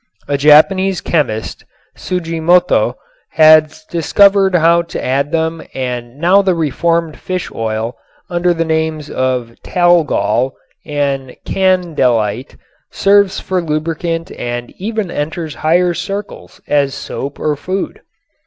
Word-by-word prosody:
A 145 Hz, -, 0 dB
Japanese 175 Hz, +7 st, +4 dB
chemist, 125 Hz, -10 st, -2 dB, 0.3 s
Tsujimoto, 175 Hz, 0 st, +1 dB, 0.4 s
has 155 Hz, 0 st, +5 dB
discovered 195 Hz, +4 st, +3 dB
how 170 Hz, 0 st, +4 dB
to 170 Hz, -, -6 dB
add 140 Hz, +3 st, 0 dB
them 160 Hz, 0 st, -1 dB
and 125 Hz, -1 st, -4 dB
now 180 Hz, +6 st, +4 dB
the 190 Hz, -2 st, +1 dB
reformed 165 Hz, +1 st, -1 dB
fish 185 Hz, -1 st, -4 dB
oil 110 Hz, +1 st, -3 dB, 0.3 s
under 175 Hz, 0 st, 0 dB
the 165 Hz, -1 st, 0 dB
names 160 Hz, -1 st, -2 dB
of 125 Hz, -3 st, -1 dB
"talgol" 165 Hz, -7 st, +2 dB, 0.3 s
and 140 Hz, -3 st, -2 dB
"candelite" 135 Hz, -, 0 dB, 0.3 s
serves 200 Hz, -1 st, +2 dB
for 185 Hz, -1 st, -2 dB
lubricant 165 Hz, +2 st, -3 dB
and 120 Hz, 0 st, -5 dB
even 215 Hz, -3 st, -3 dB
enters 155 Hz, +1 st, -4 dB
higher 175 Hz, +4 st, +1 dB
circles 200 Hz, +3 st, -6 dB
as 145 Hz, -2 st, +2 dB
a -, -, -7 dB
soap 140 Hz, +1 st, -6 dB
or 150 Hz, -1 st, 0 dB
food. 185 Hz, +6 st, -4 dB
160 Hz, 115 wpm, -15 LUFS, 140-180 Hz, 0.4 s, has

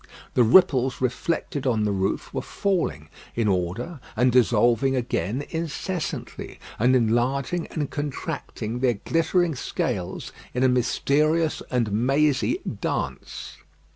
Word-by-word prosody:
The -, -, +4 dB
ripples 130 Hz, 0 st, +5 dB
reflected 130 Hz, +2 st, -1 dB
on 110 Hz, -4 st, +2 dB
the 105 Hz, -, +1 dB
roof 95 Hz, 0 st, -1 dB
were -, -, -1 dB
falling 175 Hz, -, -1 dB, 0.3 s
in 115 Hz, -2 st, +1 dB
order 100 Hz, -, -1 dB, 0.2 s
and 125 Hz, +3 st, +3 dB
dissolving 120 Hz, +2 st, +3 dB
again 120 Hz, +1 st, -1 dB
incessantly, 165 Hz, +2 st, -4 dB, 0.2 s
and 125 Hz, +4 st, +4 dB
enlarging 130 Hz, +8 st, +1 dB
and 150 Hz, -3 st, -3 dB
contracting 130 Hz, -5 st, -4 dB
their 125 Hz, -2 st, +2 dB
glittering 165 Hz, -, +1 dB
scales 95 Hz, -8 st, -3 dB, 0.2 s
in 125 Hz, -, +1 dB
a -, -, +6 dB
mysterious 150 Hz, +6 st, +2 dB
and 120 Hz, -4 st, 0 dB
mazy 140 Hz, -, +2 dB, 0.2 s
dance. -, -, -4 dB
130 Hz, 115 wpm, -25 LUFS, 115-150 Hz, 0.3 s, a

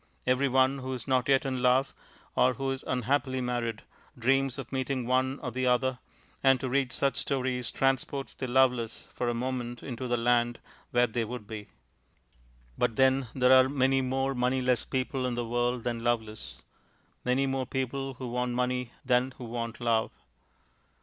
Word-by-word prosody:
Every 130 Hz, +2 st, +2 dB
one 130 Hz, +1 st, +3 dB
who 130 Hz, 0 st, -4 dB
is 125 Hz, 0 st, -6 dB
not 130 Hz, -1 st, +1 dB
yet 135 Hz, 0 st, +4 dB
in 130 Hz, -2 st, -2 dB
love, 130 Hz, +2 st, +3 dB, 0.4 s
or 130 Hz, 0 st, +4 dB
who 135 Hz, +3 st, -2 dB
is 135 Hz, -, -4 dB
unhappily 130 Hz, +1 st, 0 dB
married, 120 Hz, -3 st, -2 dB, 0.3 s
dreams 135 Hz, +2 st, +2 dB
of -, -, -7 dB
meeting 130 Hz, -1 st, -1 dB
one 130 Hz, +2 st, +1 dB
or 125 Hz, -, -3 dB
the 130 Hz, +1 st, -1 dB
other, 125 Hz, +1 st, +2 dB, 0.4 s
and 135 Hz, -1 st, +5 dB
to 130 Hz, -, -3 dB
read 130 Hz, 0 st, +1 dB
such 140 Hz, -1 st, +1 dB
stories 130 Hz, -3 st, -1 dB
transports 135 Hz, +1 st, -1 dB
the 130 Hz, -, -5 dB
loveless 125 Hz, -3 st, +1 dB
for 125 Hz, -, -1 dB
a 120 Hz, -, -1 dB
moment 120 Hz, -1 st, -3 dB
into 130 Hz, 0 st, -5 dB
the 120 Hz, 0 st, +1 dB
land 120 Hz, 0 st, +2 dB, 0.3 s
where 120 Hz, 0 st, +4 dB
they 115 Hz, 0 st, -2 dB
would 115 Hz, -1 st, -6 dB
be. 105 Hz, -1 st, -7 dB, 1.1 s
But 120 Hz, -2 st, +1 dB
then 130 Hz, 0 st, +3 dB
there 130 Hz, 0 st, +5 dB
are 130 Hz, 0 st, +7 dB
many 135 Hz, -1 st, +2 dB
more 135 Hz, +1 st, 0 dB
moneyless 125 Hz, -1 st, +1 dB
people 130 Hz, 0 st, -1 dB
in 125 Hz, -, -2 dB
the 120 Hz, 0 st, -2 dB
world 120 Hz, +1 st, 0 dB
than 120 Hz, -1 st, -2 dB
loveless; 110 Hz, -, -2 dB, 0.6 s
many 130 Hz, +2 st, +2 dB
more 135 Hz, -1 st, -1 dB
people 135 Hz, +1 st, -3 dB
who 125 Hz, 0 st, -6 dB
want 125 Hz, 0 st, -1 dB
money 125 Hz, -1 st, -1 dB
than 125 Hz, +1 st, +2 dB
who -, -, -8 dB
want 115 Hz, 0 st, -4 dB
love. 115 Hz, -2 st, +1 dB
125 Hz, 175 wpm, -29 LUFS, 120-130 Hz, 1.1 s, are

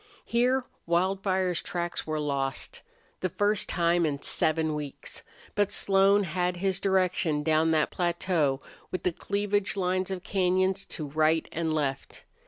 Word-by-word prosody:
Here 250 Hz, +2 st, +2 dB, 0.2 s
Wildfire's 185 Hz, +1 st, +1 dB
tracks 175 Hz, -2 st, -3 dB
were 155 Hz, -1 st, -1 dB
lost, 140 Hz, -2 st, -2 dB, 0.4 s
the 185 Hz, -, -1 dB
first 205 Hz, +3 st, +1 dB
time 170 Hz, 0 st, +2 dB
in 145 Hz, -3 st, 0 dB
seven 160 Hz, +1 st, 0 dB
weeks. 150 Hz, -2 st, -5 dB, 0.3 s
But 205 Hz, -1 st, +1 dB
Slone 195 Hz, +1 st, +4 dB
had 180 Hz, 0 st, -1 dB
his 190 Hz, +1 st, 0 dB
direction 180 Hz, -6 st, +1 dB
down 160 Hz, +1 st, +3 dB
that 155 Hz, -2 st, +2 dB
plateau 170 Hz, -5 st, 0 dB, 0.3 s
with 185 Hz, -, -4 dB
the 180 Hz, -, +2 dB
cleavage 205 Hz, +2 st, -1 dB
lines 185 Hz, 0 st, 0 dB
of 185 Hz, -2 st, -4 dB
cañons 185 Hz, 0 st, +1 dB
to 155 Hz, -, -5 dB
right 155 Hz, +2 st, +2 dB
and 165 Hz, -1 st, -1 dB
left. 140 Hz, -3 st, -2 dB
180 Hz, 140 wpm, -28 LUFS, 155-190 Hz, 0.4 s, Slone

